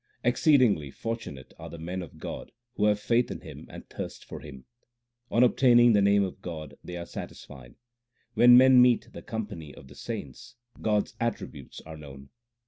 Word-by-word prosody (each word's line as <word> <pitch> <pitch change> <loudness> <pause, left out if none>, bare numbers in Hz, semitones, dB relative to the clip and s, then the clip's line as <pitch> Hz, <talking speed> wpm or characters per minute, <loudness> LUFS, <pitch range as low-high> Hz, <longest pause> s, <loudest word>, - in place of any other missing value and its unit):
Exceedingly 125 - +3
fortunate 75 - -7
are - - -8
the 85 - -9
men 90 +3 -5
of 85 - -11
God - - -7 0.2
who 105 - 0
have 105 -1 +2
faith 120 +3 +1
in - - -6
Him - - -11
and - - -11
thirst - - -8
for - - -8
Him: 65 -4 -12 0.6
On 115 - +3
obtaining 120 -1 +5
the 105 - +4
name 100 0 +4
of 95 0 -6
God, 80 -4 -7
they 90 - -7
are 85 - -6
satisfied; 65 -7 -10 0.6
when 120 0 +7
men 130 0 +7
meet 125 -1 +3
the - - -9
company 100 -9 -6
of 65 - -14
the 70 - -14
saints, 105 - -8 0.3
God 105 -2 +2
s - - -19
attributes 100 - -5
are 80 0 -10
known. 70 -2 -12
100 Hz, 180 wpm, -27 LUFS, 75-120 Hz, 0.6 s, when